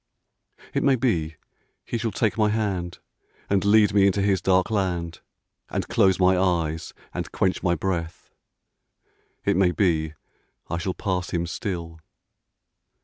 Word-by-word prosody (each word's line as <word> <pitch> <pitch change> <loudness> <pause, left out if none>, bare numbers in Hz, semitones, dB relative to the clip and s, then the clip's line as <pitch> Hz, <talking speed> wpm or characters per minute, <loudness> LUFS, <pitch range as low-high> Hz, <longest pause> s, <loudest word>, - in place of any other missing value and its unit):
It - - +1
may 135 -1 +4
be 85 -11 0 0.5
he 120 - -3
shall 115 - -1
take 110 -1 0
my 105 -2 +2
hand 95 -5 -2 0.5
And 100 -2 +3
lead 105 0 +5
me 100 -1 +5
into 100 0 +1
his 100 -2 +2
dark 95 +2 +2
land 90 -5 -1 0.5
And - - -3
close 95 -2 +3
my 95 0 +5
eyes 85 -4 -1 0.2
and - - -4
quench 95 -1 0
my 85 -2 +2
breath 85 -1 -4 0.6
— - - -43
It - - +2
may 95 -1 +4
be 80 -5 0 0.6
I 85 - -1
shall 90 0 -3
pass 90 -2 -2
him 85 -1 -1
still. 85 -2 -5
95 Hz, 145 wpm, -24 LUFS, 85-100 Hz, 0.6 s, lead